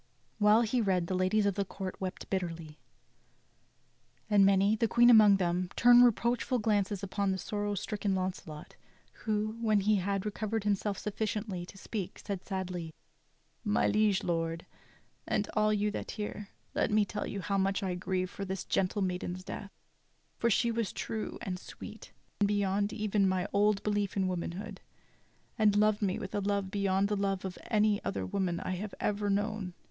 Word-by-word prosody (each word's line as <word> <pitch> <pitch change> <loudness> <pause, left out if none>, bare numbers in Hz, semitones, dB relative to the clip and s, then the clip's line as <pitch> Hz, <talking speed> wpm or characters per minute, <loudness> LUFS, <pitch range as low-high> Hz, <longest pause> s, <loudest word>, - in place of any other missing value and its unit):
While 210 +2 +5
he 235 +2 +1
read 185 -4 +1
the 185 - -3
ladies 185 +3 +2
of 200 - +2
the 200 +1 -1
court 190 -1 -6
wept 185 0 -5
bitterly; 165 -5 -3 1.5
and 205 -1 +6
many, 195 +2 +4
the 225 +1 +1
Queen 240 +2 +6
among 210 -3 +8
them, 180 0 0
turned 245 0 +7
reproachful 240 +2 +2
glances 205 -3 0
upon 200 0 -1
the 190 - -1
sorrow 205 +2 -2
stricken 205 0 -2
Launcelot, 185 -5 -5 0.4
who, 215 0 -2
when 215 -3 +3
he 210 +1 +3
had* 195 +1 -1
recovered 215 +1 -2
himself 205 -1 0
sufficiently 210 -3 -3
to 195 - -12
speak, 195 -2 -5
said 195 -3 -5
sadly; 180 -4 -4 0.7
"My 210 -2 +2
liege 210 -2 +2
Lord, 165 -1 -2 0.6
and 205 -1 0
all 215 0 +3
you 210 0 +1
that - - -5
hear, 210 -1 -5 0.2
let - - +1
me 210 0 +3
tell 210 +1 -4
you 200 - -4
how 195 +1 -1
much 195 +1 0
I 185 -2 -1
grieve 185 0 -2
for 200 - -6
this 190 -1 -4
gentle 195 +2 0
maiden's 180 0 -3
death, 200 - -7 0.7
for 235 - +2
she 235 +2 +2
was 230 -3 -1
true 220 -1 -4
and 185 -4 -3
sweet - - -10 0.3
beyond 200 0 +1
even 210 -3 +1
my 185 0 0
old 205 0 +3
belief 205 -2 -1
in 190 -1 +2
womanhood, 185 +3 -4 0.8
and 210 -2 +4
loved 210 0 +3
me 195 -2 0
with - - -6
a 205 - 0
love 200 -1 -1
beyond 200 -1 +1
the 210 - 0
love 195 -1 -1
of 185 -1 -6
any 210 -2 +2
other 95 -1 -2
woman 175 - -1
I - - -3
have 195 +3 -4
ever 205 0 -1
known. 205 -2 -1
200 Hz, 175 wpm, -31 LUFS, 185-210 Hz, 1.5 s, among